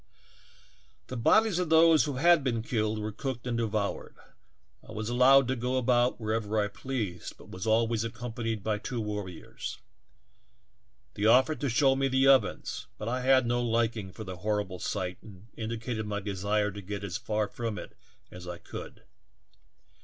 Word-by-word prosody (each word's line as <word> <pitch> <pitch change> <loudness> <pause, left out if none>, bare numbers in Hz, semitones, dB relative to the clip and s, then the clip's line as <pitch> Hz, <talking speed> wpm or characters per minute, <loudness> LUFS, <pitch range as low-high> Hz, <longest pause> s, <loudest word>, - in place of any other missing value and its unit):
"The 130 - -5
bodies 205 - +3
of 180 -3 -1
those 160 -3 +6
who 145 - -2
had 170 +2 +5
been 115 -4 -1
killed 110 -2 -1
were 105 0 -3
cooked 125 +2 -5
and 120 -1 -1
devoured; 110 -3 -2 0.7
I - - -12
was 110 0 -4
allowed 130 +2 +6
to 130 - +1
go 125 +2 -1
about 125 0 +2
wherever 110 -1 -1
I 105 -1 +1
pleased, 105 -6 -5
but - - -15
was 95 +3 -5
always 115 0 +2
accompanied 115 -2 -4
by 105 0 -1
two 120 +2 -4
warriors. 105 -5 -5 1.4
They 105 - -2
offered 130 +7 +4
to 140 - 0
show 135 +3 +4
me 135 0 +1
the 135 0 +3
ovens, 135 -6 +2
but 105 - -6
I 125 +1 -1
had 130 0 +4
no 120 +1 +1
liking 115 -4 0
for 110 - -8
the 95 -3 -7
horrible 105 -2 -2
sight 90 -3 -3
and 100 -1 -14
indicated 110 0 -4
my 105 0 -2
desire 105 +1 -1
to 100 +1 -8
get 100 +1 -6
as 95 -4 -3
far 105 -1 -1
from 115 -1 -4
it - - -9 0.4
as 90 0 -10
I 90 -1 -5
could. - - -9
115 Hz, 170 wpm, -29 LUFS, 105-125 Hz, 1.4 s, those